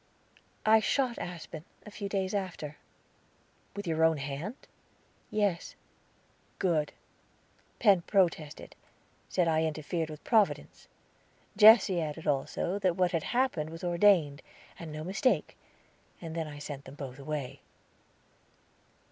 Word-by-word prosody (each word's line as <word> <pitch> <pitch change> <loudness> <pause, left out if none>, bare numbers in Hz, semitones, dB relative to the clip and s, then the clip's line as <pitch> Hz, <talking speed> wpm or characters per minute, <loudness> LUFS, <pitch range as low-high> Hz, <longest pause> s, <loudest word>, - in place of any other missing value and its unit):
"I 220 +1 +7
shot 245 +2 0
Aspen, 165 -3 -7 0.2
a 210 - -10
few 200 -1 -5
days 190 -1 -1
after." 175 -7 -4 1.0
"With 205 0 -5
your 160 -1 +1
own 160 -1 +4
hand?" 145 - -5 0.7
"Yes." 205 -5 -1 0.8
"Good." 160 -5 0 0.8
"Penn 200 -6 +5
protested, 170 -6 0 0.5
said 180 -2 +1
I 160 -1 +2
interfered 160 +1 -2
with 155 0 -9
Providence. 220 -4 +1 0.7
Jesse 210 -4 +7
added, 155 +1 -5
also, 150 +7 -1
that 185 -3 +1
what 180 -1 +2
had 165 -4 -1
happened 240 -12 0
was 165 +3 -9
ordained, 175 -5 +3 0.4
and 165 -2 -7
no 155 0 -6
mistake, 195 - 0 0.6
and 165 -2 -7
then 165 -2 -2
I 145 -1 -8
sent 145 -1 -7
them 135 - -11
both 135 -2 -8
away." 140 -2 -5
170 Hz, 120 wpm, -30 LUFS, 150-200 Hz, 1.0 s, I